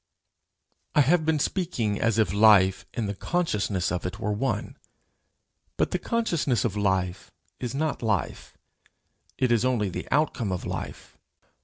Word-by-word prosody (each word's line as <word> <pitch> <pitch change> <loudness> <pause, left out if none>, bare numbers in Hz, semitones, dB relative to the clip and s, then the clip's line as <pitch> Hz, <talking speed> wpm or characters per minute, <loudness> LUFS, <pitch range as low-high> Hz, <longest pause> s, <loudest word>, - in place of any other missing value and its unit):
I 150 - +6
have 160 +3 +3
been 160 -1 +3
speaking 140 - -1
as 115 -1 +2
if 105 -5 +2
life 100 -3 +5
and 115 -3 -1
the 100 - -2
consciousness 105 - -1
of 90 - -2
it 90 +1 -5
were 105 - -1
one; 105 0 -2 1.0
but - - +1
the - - 0
consciousness 170 - 0
of 105 -4 -1
life 95 -3 -1 0.3
is 125 0 -4
not 155 +1 -1
life; 110 -5 -2 0.8
it 130 -2 +1
is 115 -1 +3
only 120 -6 +1
the 90 - -6
outcome 130 -7 +1
of 90 - -3
life. - - -7
110 Hz, 150 wpm, -26 LUFS, 100-140 Hz, 1.0 s, I